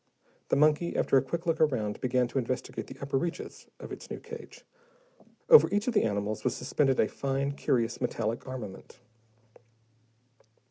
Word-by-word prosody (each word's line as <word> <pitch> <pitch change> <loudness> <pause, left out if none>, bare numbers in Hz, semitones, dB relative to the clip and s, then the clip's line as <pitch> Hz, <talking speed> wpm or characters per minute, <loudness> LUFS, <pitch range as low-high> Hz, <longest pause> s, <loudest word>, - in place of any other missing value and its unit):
The - - +3
monkey, 155 +4 +3
after - - +2
a 135 - +6
quick 165 +7 -4
look 165 -1 0
around, 115 -9 +1
began 125 -1 +1
to 135 - -1
investigate 130 0 -4
the - - -10
upper 140 -1 0
reaches 170 +4 -5
of - - -9
its - - -8
new - - -5
cage. 465 0 -11 0.8
Over 470 -2 +9
each 205 +3 0
of 250 - +1
the - - +3
animals 105 0 -2
was 125 -2 0
suspended 135 +1 +1
a 110 - +4
fine, 140 0 -2
curious 120 -4 0
metallic 115 -1 -2
armament. 120 -7 -8
130 Hz, 160 wpm, -29 LUFS, 120-155 Hz, 0.8 s, Over